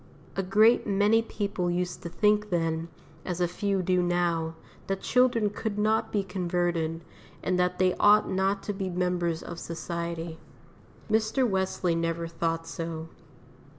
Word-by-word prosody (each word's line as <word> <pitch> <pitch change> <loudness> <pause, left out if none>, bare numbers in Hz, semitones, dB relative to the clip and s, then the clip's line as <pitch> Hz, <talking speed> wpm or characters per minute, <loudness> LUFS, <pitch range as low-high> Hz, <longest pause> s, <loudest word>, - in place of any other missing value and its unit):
A 195 - +1
great 215 +6 +4
many 205 +3 +4
people 200 -5 -2
used 175 0 -2
to 170 - -5
think 210 +3 +2
then, 165 -2 0 0.4
as 180 -1 -3
a 175 - +2
few 195 +2 -1
do 180 0 +2
now, 170 -2 0 0.3
that 195 0 -2
children 240 -5 +3
could 210 0 -4
not 215 +1 +1
be 205 -2 +1
converted, 175 -3 -1 0.4
and 180 -1 +1
that 180 0 +1
they 185 -1 +3
ought 210 +1 +6
not 195 +1 0
to 205 - -3
be 195 -1 -3
members 175 -2 -1
of 170 -1 -7
society. 170 -1 -5 0.7
Mr. 220 +4 +2
Wesley 190 -3 0
never 165 0 -1
thought 165 0 -2
so. 165 -1 -5
180 Hz, 150 wpm, -28 LUFS, 170-205 Hz, 0.7 s, ought